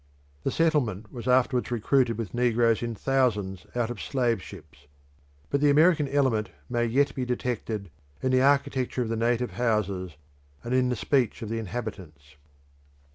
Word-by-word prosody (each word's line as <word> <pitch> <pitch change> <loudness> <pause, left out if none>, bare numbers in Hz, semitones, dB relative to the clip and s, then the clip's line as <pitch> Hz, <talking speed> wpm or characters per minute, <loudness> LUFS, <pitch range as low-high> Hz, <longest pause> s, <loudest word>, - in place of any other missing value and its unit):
The - - 0
settlement 120 - 0
was 120 -1 -7
afterwards 125 0 +2
recruited 120 0 +1
with 115 -5 -5
negroes 120 -2 +2
in 115 -1 -3
thousands 105 -8 0
out 120 -1 0
of 120 - -7
slave 120 -6 0
ships; 75 -4 -13 0.6
but 140 - +1
the 145 - +5
American 155 0 +4
element 130 -6 +1 0.2
may 120 -1 0
yet 140 +5 +2
be 130 - -3
detected 115 -6 -3 0.3
in 130 - +1
the 130 0 +4
architecture 135 -2 +2
of 115 - -5
the 115 - -1
native 120 +2 0
houses 100 -8 -1 0.5
and 120 - -3
in 130 -1 +3
the 125 - 0
speech 120 -1 0
of 110 - -5
the 115 0 -2
inhabitants. 90 -9 -7
120 Hz, 160 wpm, -27 LUFS, 110-130 Hz, 0.6 s, the